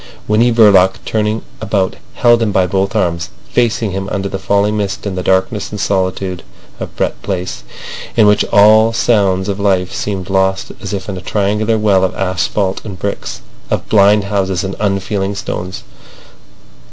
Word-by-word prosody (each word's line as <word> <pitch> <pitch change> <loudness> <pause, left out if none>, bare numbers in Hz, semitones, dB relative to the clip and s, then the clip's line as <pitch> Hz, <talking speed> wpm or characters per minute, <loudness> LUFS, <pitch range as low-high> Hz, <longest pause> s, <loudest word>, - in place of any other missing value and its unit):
Winnie 115 +3 +3
Verloc 100 -5 +5
turning 110 0 -1 0.2
about 100 -3 0 0.2
held 120 -1 +4
him 110 -2 +1
by 95 -2 +2
both 95 +2 -1
arms, 85 -3 0 0.2
facing 115 -3 +1
him 95 +1 -4
under 100 0 -2
the 95 - -4
falling 100 +2 +1
mist 100 -1 -3
in 100 - -2
the 90 - -3
darkness 95 +2 0
and 105 - -6
solitude 95 -2 -1 0.4
of - - -7
Brett - - -2
Place, 95 -2 -4 0.6
in 110 - +6
which 105 0 +4
all 110 +2 +6
sounds 100 -5 +1
of 100 0 -3
life 95 -3 +1
seemed 95 -2 -4
lost 95 0 0
as 100 - -5
if 95 -2 -4
in 95 -2 -4
a - - -7
triangular 105 +3 0
well 100 -3 +2
of 95 - -1
asphalt 95 +1 -1
and 100 -3 -7
bricks, 100 +2 -4 0.3
of - - -2
blind 105 0 +5
houses 95 -2 -1
and 95 0 -4
unfeeling 100 0 -1
stones. 90 -2 -5
100 Hz, 165 wpm, -15 LUFS, 95-105 Hz, 0.6 s, in